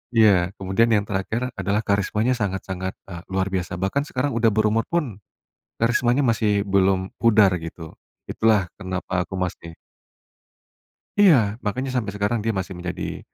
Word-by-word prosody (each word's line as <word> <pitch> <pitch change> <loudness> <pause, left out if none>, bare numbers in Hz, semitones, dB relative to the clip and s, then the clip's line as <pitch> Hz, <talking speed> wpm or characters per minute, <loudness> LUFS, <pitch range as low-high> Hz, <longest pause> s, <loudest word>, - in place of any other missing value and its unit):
Iya. 100 -4 +4
Kemudian 95 +4 +1
yang 105 - +2
terakhir 110 +6 -2
adalah 100 +3 0
karismanya 105 +4 +1
sangat-sangat, 95 -3 -3
eee, 85 -3 -8
luar 95 0 0
biasa, 90 -2 -2
bahkan 95 +10 0
sekarang 140 +2 -1
udah 115 0 +3
berumur 110 +1 +2
pun 145 - -2 0.6
karismanya 120 +3 +2
masih 110 -3 +2
belum 95 -1 +2
pudar, 110 -4 +5
gitu, 80 0 -9 0.3
itulah 105 -5 +2
kenapa 95 -1 -3
aku 95 - -10
masih 85 -2 -4 1.5
Iya, 185 -8 +7 0.3
makanya 130 +6 -2
sampai 105 -5 -1
sekarang 105 +3 0
dia 110 -2 -1
masih 95 0 -3
menjadi, 90 0 -5
100 Hz, 140 wpm, -23 LUFS, 95-115 Hz, 1.5 s, Iya